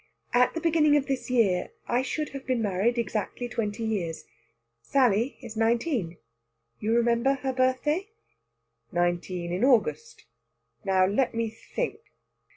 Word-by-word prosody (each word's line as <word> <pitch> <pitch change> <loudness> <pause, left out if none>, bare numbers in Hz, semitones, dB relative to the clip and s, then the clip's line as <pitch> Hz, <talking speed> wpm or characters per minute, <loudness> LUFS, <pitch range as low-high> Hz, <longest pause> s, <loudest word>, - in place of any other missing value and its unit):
At 245 +4 +4
the - - -1
beginning 305 -3 +4
of 280 - 0
this 270 -2 -3
year 205 -8 +2
I 240 +1 +2
should 300 +3 -3
have 275 -1 -9
been 255 -2 +1
married 210 +3 +1
exactly 230 +2 -2
twenty 225 -1 -3
years. 190 -7 -2 0.6
Sally 245 - +2
is 230 -3 -9
nineteen 225 - 0 0.6
you 220 +2 +1
remember 235 +3 +3
her 270 -1 -3
birthday?" 265 +9 +1 0.8
"Nineteen 175 0 -1
in 185 +6 -1
August. 270 - +1 0.6
Now, 190 -2 +3
let 220 +6 +1
me 230 -1 -1
think!" 430 - -4
235 Hz, 135 wpm, -27 LUFS, 205-270 Hz, 0.8 s, At